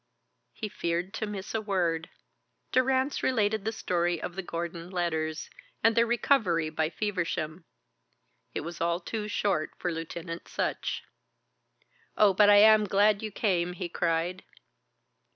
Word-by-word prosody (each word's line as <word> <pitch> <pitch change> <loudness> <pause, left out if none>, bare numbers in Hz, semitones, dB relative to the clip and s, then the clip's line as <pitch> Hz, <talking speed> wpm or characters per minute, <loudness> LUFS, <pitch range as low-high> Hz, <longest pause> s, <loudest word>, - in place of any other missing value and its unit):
He 220 - -4
feared 175 -1 -2
to 215 - -3
miss 200 -1 -6
a 225 - 0
word. 175 -5 -1 0.6
Durrance 260 +2 +2
related 215 -4 +1
the 220 - 0
story 175 -5 0
of 175 +2 -5
the 195 - -2
Gordon 170 -1 -5
letters, 160 -4 -2 0.3
and 225 0 +5
their 235 0 +4
recovery 215 - +2
by 155 0 0
Feversham. 170 -4 -3 0.9
It - - -1
was 170 +1 -7
all 170 +1 +1
too 210 +4 -4
short 200 -7 0
for 175 - -2
Lieutenant 165 +1 -6
Sutch. - - -2 1.1
"Oh, 205 -2 +6
but 205 +2 +6
I 205 - +8
am 215 0 +7
glad 205 +1 +3
you 220 - -3
came," 180 -4 0
he 175 0 -5
cried. 170 +2 -1
185 Hz, 140 wpm, -28 LUFS, 170-210 Hz, 1.1 s, I